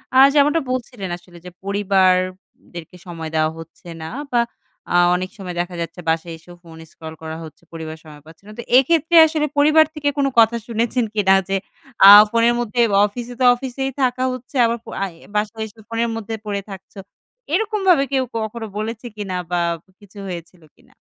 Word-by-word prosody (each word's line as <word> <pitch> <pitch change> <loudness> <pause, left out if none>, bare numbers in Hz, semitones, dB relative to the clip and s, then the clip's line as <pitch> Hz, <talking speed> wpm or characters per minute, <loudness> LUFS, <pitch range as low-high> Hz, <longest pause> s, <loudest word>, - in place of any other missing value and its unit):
আ - - +5 0.2
যেমনটা 295 +2 +3
বলছিলেন 240 -6 -4
আসলে 175 0 -18
যে 180 - -9
পরিবার 195 -2 +2 0.2
উব 185 - -23 0.4
দেরকে 170 +1 -9
সময় 165 -2 -6
দেওয়া 155 0 +1
হচ্ছে 165 +2 -13
না। 160 - -6 0.2
বা 240 - +2 0.5
আ - - +2 0.2
অনেক 185 +1 -3
সময় 180 -3 -7
দেখা 175 0 -6
যাচ্ছে 170 +2 -6
বাসায় 165 +1 -1
এসেও 175 +2 -15
ফোন 165 -1 -14
স্ক্রল 160 -1 -10
করা 160 0 -6
হচ্ছে, 155 -2 -13
পরিবার 160 -1 -7
সময় 150 -2 -14
পাচ্ছে 160 +4 -17
না। - - -10
তো - - -5 0.2
এক্ষেত্রে 325 +5 +2
আসলে 310 -1 -1
পরিবার 305 +2 +5
থেকে 290 -1 0
কোনো 275 -1 +2
কথা 230 +1 +4
শুনেছেন 235 +1 -1
কিনা? 195 -2 +4 0.2
যে, 195 - +1 0.5
"আ - - +12 0.2
ফোনের 230 0 +3
মধ্যে 240 0 -3 0.3
অফিসে 240 +4 -6
তো - - 0
অফিসেই 265 +1 -4
থাকা 255 0 +1
হচ্ছে। 255 +2 -11
আবার 230 +1 0 0.3
আ - - +1 0.2
এ - - -18
বাসায় 215 +1 -2
এসে 220 +1 -19
ফোনের 230 +1 -1
মধ্যে 225 0 -6
পড়ে 200 -1 -3
থাকছ।" 190 -1 -11 0.6
এরকমভাবে 385 -6 +2
কেউ 265 -1 +1
কখনো 220 +1 -4
বলেছে 225 +2 -5
কিনা 195 -3 -4
বা 175 -1 +1 0.2
ব - - -68
কিছু 205 0 -18
হয়েছিল 175 -1 -8
কিনা? - - -26
210 Hz, 185 wpm, -20 LUFS, 175-250 Hz, 0.6 s, আ